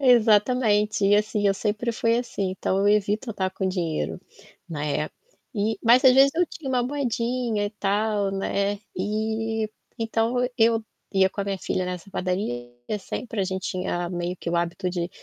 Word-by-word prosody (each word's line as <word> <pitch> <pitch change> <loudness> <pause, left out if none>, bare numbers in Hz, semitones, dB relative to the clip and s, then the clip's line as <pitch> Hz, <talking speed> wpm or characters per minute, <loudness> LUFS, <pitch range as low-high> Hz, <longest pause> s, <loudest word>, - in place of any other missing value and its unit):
Exatamente, 215 -3 +4
e 200 +1 +5
assim 210 0 +1
eu 195 - +3
sempre 215 +4 -1
fui 230 0 +2
assim, 200 -6 -2
então, 190 0 -1
eu 200 +1 +3
evito 210 +3 +1
andar 190 -3 -1
com 190 0 -2
dinheiro, 160 - -2 0.5
né. 150 -1 -2 0.5
E 210 +1 0
mas 240 +3 +6
às 260 - +9
vezes 270 +2 +6
eu 350 +2 +3
tinha 300 -3 -8
uma 250 -2 +2
moedinha 245 -4 -1
e - - -5
tal, 205 -1 0
né, 200 +1 0
eh, - - -10 1.2
então, 225 +1 0 0.2
eu 225 0 +4 0.3
ia 190 -1 +4
com 200 - -5
a - - -1
minha 195 -1 -2
filha 185 - -1
nessa 180 +2 -6
padaria 180 - -2 0.2
e 210 - -1
sempre 220 +2 -4
a - - +2
gente 190 0 -3
tinha 175 -2 -2
meio 175 0 -3
que 170 - -4
o 170 - +1
hábito 170 +1 -1
de 175 -1 -2
205 Hz, 175 wpm, -25 LUFS, 185-230 Hz, 1.2 s, às